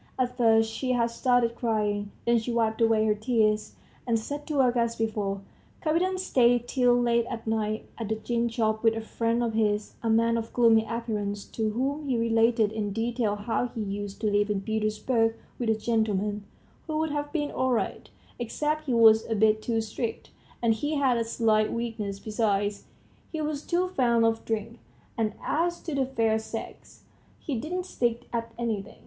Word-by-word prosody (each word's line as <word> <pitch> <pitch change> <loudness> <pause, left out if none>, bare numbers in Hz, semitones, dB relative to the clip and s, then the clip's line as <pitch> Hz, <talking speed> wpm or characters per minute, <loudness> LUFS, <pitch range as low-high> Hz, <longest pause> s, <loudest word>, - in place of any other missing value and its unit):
At 250 -1 0
first 225 -2 +4
she 255 +2 -1
had 235 -1 +1
started 245 -1 +2
crying, 210 -3 -1
then 235 0 +4
she 225 +2 -4
wiped 225 -1 0
away 225 -1 +4
her 215 - +3
tears, 215 -1 +1 0.3
and 230 -1 +3
set 290 +6 -5
to 305 - -3
work 255 -3 +3
as 235 -1 +1
before. 210 -3 -2 0.4
Kapiton 355 +4 +1
stayed 245 -9 +3
till 245 -1 +3
late 235 -1 +2
at 230 -2 -6
night 215 -1 -1
at 225 -2 -4
the 220 - +1
gin 235 +1 -1
shop 220 -2 0
with 225 -1 +3
a 225 - -3
friend 230 +1 -1
of 230 -1 -1
his, 210 -1 0
a 230 - -1
man 230 +1 +3
of 225 0 -7
gloomy 225 -2 +4
appearance, 210 -3 -3
to 220 -1 -1
whom 275 +6 -2
he 250 - +2
related 230 -1 +3
in 215 -2 -2
detail 225 0 -1
how 225 +4 -1
he 230 -2 -6
used 200 0 -5
to 215 -2 +1
live 205 +1 +2
in 200 -2 0
Petersburg 220 +2 0 0.2
with 240 -2 -1
a 220 - +4
gentleman, 210 -2 -1 0.4
who 310 -1 -2
would 315 -1 0
have 290 0 -3
been 295 -3 -1
all 260 - 0
right, 230 - -2 0.3
except 300 +6 -2
he 250 - +1
was 220 -1 +6
a 225 - +1
bit 215 +1 +3
too 225 0 0
strict, 220 +1 -5 0.3
and 230 -1 +4
he 290 +8 -2
had 270 -4 +3
a 230 - +1
slight 220 -2 +2
weakness 220 -4 -3
besides, 205 -1 -1 0.5
he 320 - -4
was 300 -1 -2
too 355 +3 0
fond 235 -8 +2
of 225 0 +1
drink; 225 +1 -3 0.4
and, 220 -2 0
as 345 +2 0
to 325 - -6
the 270 -2 +1
fair 225 -4 +1
sex, 225 +1 -8 0.3
he 295 - -5
didn't 345 +9 -3
stick 240 -8 -1
at 230 -1 -2
anything. 220 -4 -3
230 Hz, 190 wpm, -27 LUFS, 220-245 Hz, 0.5 s, was